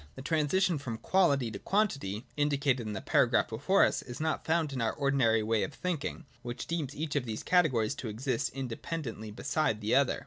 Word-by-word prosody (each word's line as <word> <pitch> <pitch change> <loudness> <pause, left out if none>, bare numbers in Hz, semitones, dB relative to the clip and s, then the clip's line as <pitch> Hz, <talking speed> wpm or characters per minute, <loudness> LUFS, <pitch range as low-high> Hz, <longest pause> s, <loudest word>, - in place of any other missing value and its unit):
(2) 75 - -19
The 130 - -8
transition 160 +3 +2
from 120 -5 -5
Quality 140 -4 +2
to 100 - -6
Quantity, 140 - 0
indicated 140 -5 +1
in 105 - -3
the 95 - -4
paragraph - - +3
before - - +3
us, - - 0
is 120 - -8
not 160 0 -1
found 160 -3 +1
in 130 - -2
our 115 - +1
ordinary 130 -6 +2
way 110 0 +1
of 145 - -3
thinking, 170 -2 -3 0.2
which 120 0 -5
deems 155 -4 -3
each 150 -1 -3
of 140 -3 0
these 110 -2 -4
categories 140 -10 +3
to 135 -4 -6
exist 115 +3 -1
in 135 -1 -4
dependently 115 -3 -5
beside 110 +1 -1
the 110 +1 -1
other. 140 -1 +3
135 Hz, 205 wpm, -30 LUFS, 115-155 Hz, 0.2 s, paragraph